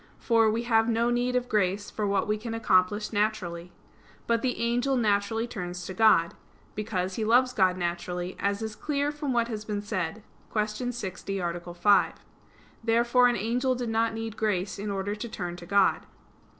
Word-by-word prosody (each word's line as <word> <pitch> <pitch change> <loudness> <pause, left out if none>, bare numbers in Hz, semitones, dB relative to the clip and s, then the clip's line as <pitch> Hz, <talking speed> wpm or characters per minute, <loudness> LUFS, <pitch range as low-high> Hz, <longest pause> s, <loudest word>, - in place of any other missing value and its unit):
For, 230 -2 +3
we 225 +2 -1
have 225 -1 +3
no 230 +1 +2
need 245 +1 0
of 250 0 0
grace 205 -2 0
for 210 -1 -2
what 200 0 +1
we 210 - +1
can 225 +1 -5
accomplish 210 0 +2
naturally. 185 -5 -1 0.5
But 230 -1 +1
the 255 -1 -1
angel 245 +3 +1
naturally 220 0 +1
turns 180 -5 -6
to 190 - -5
God: 185 -5 +4 0.4
because 195 -3 -2
he 225 - -1
loves 250 +3 +4
God 185 -2 +3
naturally, 175 +1 -3
as 200 +2 -1
is 220 -1 -4
clear 290 +2 -1
from 295 -2 -3
what 235 -2 +2
has 215 -3 -5
been 210 -1 -3
said 205 -1 -3 0.3
(Q. 215 +3 -1
60, 195 -3 -5
A. 175 -1 -4
5). 190 +2 +4 0.7
Therefore 235 +2 +4
an 245 - +1
angel 245 +5 0
did 245 -2 -3
not 225 0 +1
need 225 -1 -5
grace 200 -3 -1
in 205 +1 -4
order 200 0 -2
to 215 +3 -6
turn 175 -5 -5
to 175 - -11
God. 200 +1 +2
215 Hz, 180 wpm, -27 LUFS, 190-235 Hz, 0.7 s, God